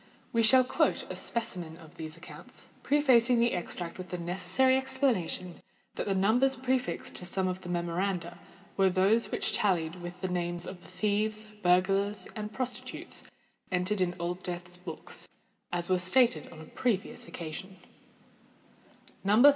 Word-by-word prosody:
We 230 - +4
shall 255 +4 +7
quote 255 - +1
a - - -4
specimen 175 -8 -2
of 160 -2 -14
these 160 0 -7
accounts, 175 - -12 0.2
prefacing 255 -4 +4
the 235 +1 +3
extract 175 0 -4
with 185 0 -7
the 180 - -3
necessary 185 +9 +2
explanation 260 - 0 0.3
that - - -3
the 195 - +1
numbers 240 +8 +4
prefixed 255 -8 -1
to - - -4
some 190 +1 0
of 185 0 -3
the 180 - -8
memoranda 175 0 -1 0.4
were 195 -1 +5
those 195 +5 +3
which - - 0
tallied 175 -4 +1
with 175 +1 -7
the 185 - -2
names 175 -1 -1
of 180 -1 -8
the - - -15
thieves, 215 +1 -1
burglars, 195 +3 +2
or 210 -1 -3
prostitutes 250 +3 -4 0.5
entered 185 +2 0
in 175 -1 +1
Old 175 +1 -2
Death's 180 0 -5
books, 180 -3 -7 0.4
as 175 -1 -1
was 185 -1 +2
stated 240 +6 +3
on 165 - -11
a - - -9
previous 215 +1 -1
occasion:— 185 +4 -7 1.5
_No. 210 +6 +6
185 Hz, 155 wpm, -30 LUFS, 175-225 Hz, 1.5 s, shall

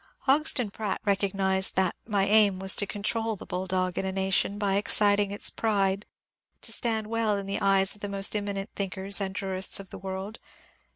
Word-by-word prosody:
Hodgson 270 -5 +2
Pratt 210 -1 -3
recognized 195 -1 +1
that 185 -2 +1
my 200 -3 +1
aim 205 -2 +4
was 190 0 +4
to 205 - +1
control 220 +2 -2
the - - -11
bulldog 185 0 -2
in - - -2
a - - -2
nation 195 +1 0
by 200 -1 0
exciting 205 0 +3
its 205 +1 +1
pride 200 -2 0 0.6
to - - -2
stand 225 -3 -1
well 220 -1 0
in 200 - -5
the 195 +1 -3
eyes 195 -1 +3
of 205 - -17
the 205 - -4
most 195 +1 0
eminent 200 0 -3
thinkers 195 +1 0
and 190 -1 -3
jurists 190 -1 0
of 195 -1 -10
the - - -8
world. 190 +3 -6
200 Hz, 185 wpm, -27 LUFS, 190-210 Hz, 0.6 s, aim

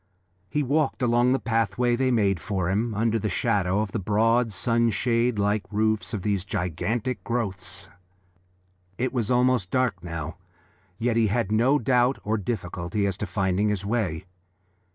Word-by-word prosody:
He 150 - 0
walked 140 -1 0
along 120 +1 +3
the 135 - +3
pathway 115 0 +1
they 130 +1 +1
made 100 -7 +2
for 95 -2 -2
him, 110 +3 0
under 115 +1 +1
the 105 - -2
shadow 100 -1 +1
of 105 -2 -3
the 110 - -2
broad, 115 +4 +2
sunshade 115 +3 +1
like 105 +1 +1
roofs 110 +1 0
of 105 -6 -4
these 100 -3 0
gigantic 105 +6 -2
growths. 95 -5 -4 1.1
It 130 +3 -1
was 120 -5 -1
almost 125 -6 +2
dark 125 -8 0
now, 80 0 -5 0.6
yet 115 0 0
he 115 -1 +4
had 105 0 0
no 120 +7 +4
doubt 125 0 +2
or 110 +1 0
difficulty 95 -1 -3
as 100 -2 0
to 105 - -4
finding 95 +2 0
his 100 -2 -2
way. 100 -6 -1
110 Hz, 155 wpm, -25 LUFS, 100-120 Hz, 1.1 s, he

